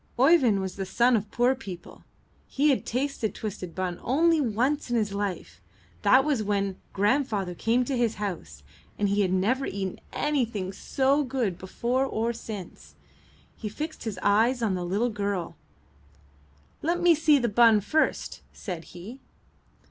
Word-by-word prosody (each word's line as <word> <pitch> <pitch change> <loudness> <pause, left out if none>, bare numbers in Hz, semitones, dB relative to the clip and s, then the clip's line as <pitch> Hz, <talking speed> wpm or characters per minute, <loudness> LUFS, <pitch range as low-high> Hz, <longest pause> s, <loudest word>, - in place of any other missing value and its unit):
Oeyvind 255 - +4
was 190 0 -5
the 195 - -3
son 240 +4 +3
of 210 -1 -2
poor 245 +4 +2
people; 195 -10 -10 0.4
he 290 +2 +2
had 265 - -1
tasted 255 -3 -2
twisted 185 -5 -6
bun 185 -2 -3
only 320 +5 +3
once 255 +4 0
in 240 - 0
his 210 -3 0
life; 185 - -4 0.4
that 265 +2 +5
was 285 -7 +1
when 200 -2 -1
grandfather 205 -3 0
came 235 +7 +1
to 270 - -2
his 235 -2 +1
house, 155 - -6 0.3
and 205 -1 +1
he 200 +1 +2
had 185 -2 +1
never 215 +9 +1
eaten 190 -2 -4
anything 230 -10 -1
so 275 +8 +1
good 250 -8 -1
before 240 +8 -1
or 235 -3 -1
since. 180 - -9 0.6
He 215 - -5
fixed 305 +9 -6
his 215 -4 -4
eyes 230 +5 +3
on 210 -4 +1
the 185 +6 0
girl. 200 -5 -3 1.3
''Let 340 +3 0
me 350 -1 +5
see 310 -1 +4
the 240 -3 +1
bun 225 0 +5
first,'' 310 +10 -1
said 175 -5 -7
he. 220 +10 -9
220 Hz, 155 wpm, -27 LUFS, 195-260 Hz, 1.3 s, that